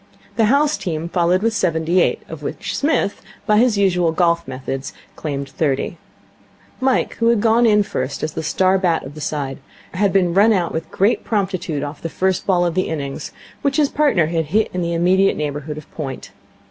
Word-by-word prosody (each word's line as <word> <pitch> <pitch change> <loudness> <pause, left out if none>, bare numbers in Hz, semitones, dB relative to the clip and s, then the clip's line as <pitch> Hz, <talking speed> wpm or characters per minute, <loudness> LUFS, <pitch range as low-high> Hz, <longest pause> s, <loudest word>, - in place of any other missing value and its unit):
The 225 - +3
house 285 +6 +3
team 165 -1 -4
followed 180 +2 +2
with 230 0 +2
seventy 170 -2 +1
eight, - - 0
of - - -8
which - - -4
Psmith, 285 -8 0 0.2
by 210 0 +4
his 235 -3 +3
usual 180 -4 +2
golf 170 0 +1
methods, 130 +1 -5 0.2
claimed 140 -3 -4
thirty. 140 +3 -1 0.8
Mike, 265 0 +1
who 230 - +1
had 235 -2 +4
gone 230 +2 +4
in 210 -1 +4
first 130 -7 -4
as 155 - -1
the - - -3
star 185 +4 +2
bat 175 -3 +1
of 135 - -9
the 155 - -9
side, 140 -3 -3 0.3
had 200 +2 +1
been 180 -3 +2
run 210 +4 +5
out 180 -4 0
with 160 0 -4
great 200 +5 +1
promptitude 185 -8 -2
off 145 +1 -6
the 165 - -4
first 190 +2 -1
ball 180 -2 +3
of 170 - 0
the 185 +2 0
innings, 140 -4 -4 0.3
which 280 -1 0
his 295 -2 +3
partner 285 - +2
had 165 0 -1
hit 210 +9 +1
in 180 - -2
the 170 0 -1
immediate 185 +3 +3
neighbourhood 150 0 -4
of 155 - -11
point. 135 -4 -6
175 Hz, 200 wpm, -20 LUFS, 155-205 Hz, 0.8 s, run